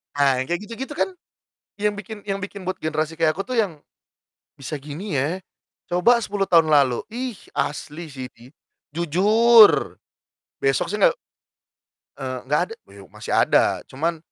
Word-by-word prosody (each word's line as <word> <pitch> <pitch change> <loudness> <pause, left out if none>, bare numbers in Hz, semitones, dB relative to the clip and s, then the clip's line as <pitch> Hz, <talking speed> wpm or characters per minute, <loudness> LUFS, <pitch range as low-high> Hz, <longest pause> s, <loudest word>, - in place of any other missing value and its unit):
Ah, 140 -2 +3
yang 130 - -3
kayak 175 +2 -2
gitu-gitu 255 +7 -7
kan 385 - 0 0.6
yang 210 +1 0
bikin 210 +1 -9
yang 195 -1 -3
bikin 195 0 -7
buat 185 +1 -4
generasi 155 0 -2
kayak 155 -1 +3
aku 195 - -3
tuh 250 0 -1
yang, 170 -9 -2 0.8
bisa 135 +3 -5
gini 150 +6 -6
ya. 150 +7 0 0.5
Coba 180 +8 +4
10 205 -3 -2
tahun 165 -2 +5
lalu, 140 -5 +4
ih 245 -2 -4 0.2
asli 150 +3 -3
sih 130 -2 -6
bi 120 +3 -18 0.4
jujur 210 +7 +5 0.7
besok 425 +1 +2
sih - - -3
gak - - +5 1.0
eee, 130 -2 -4
gak 150 - +3
ada - - -6
ya 100 0 -14
masih - - -7
ada - - +3
cuman 165 +5 -2
170 Hz, 155 wpm, -23 LUFS, 145-210 Hz, 1.0 s, tahun